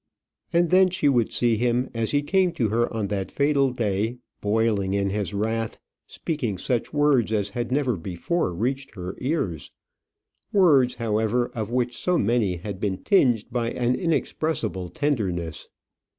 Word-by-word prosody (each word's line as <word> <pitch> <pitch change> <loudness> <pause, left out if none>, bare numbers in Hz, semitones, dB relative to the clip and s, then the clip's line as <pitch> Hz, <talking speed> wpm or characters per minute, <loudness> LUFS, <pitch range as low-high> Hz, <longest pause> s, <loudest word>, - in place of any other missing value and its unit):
And 170 0 +2
then 185 0 +6
she 175 -5 0
would 120 -5 +2
see 120 -2 +2
him, 120 +2 0
as 115 -1 -1
he 145 0 +1
came 185 +2 +2
to 120 -10 0
her 120 +3 +1
on 110 -3 -2
that 95 -2 -2
fatal 140 -1 +2
day, 110 -1 -1 0.2
boiling 105 -2 +1
in 100 -1 0
his 105 0 -2
wrath, 110 +2 -2 0.3
speaking 125 - -3
such 120 +5 -1
words 145 -7 +2
as 105 -2 0
had 120 +2 -3
never 130 -3 +1
before 90 - -2
reached 130 +10 -3
her 90 -1 -5
ears; 125 - -2 0.8
words, 145 -11 +4
however, 115 +1 0
of 110 -2 -3
which 120 0 -1
so 180 -1 0
many 105 - +1
had 95 +2 -6
been 100 -3 -1
tinged 125 - +3
by 115 -1 -1
an 120 +1 0
inexpressible 145 - -1
tenderness. 95 - -2
120 Hz, 155 wpm, -24 LUFS, 105-140 Hz, 0.8 s, then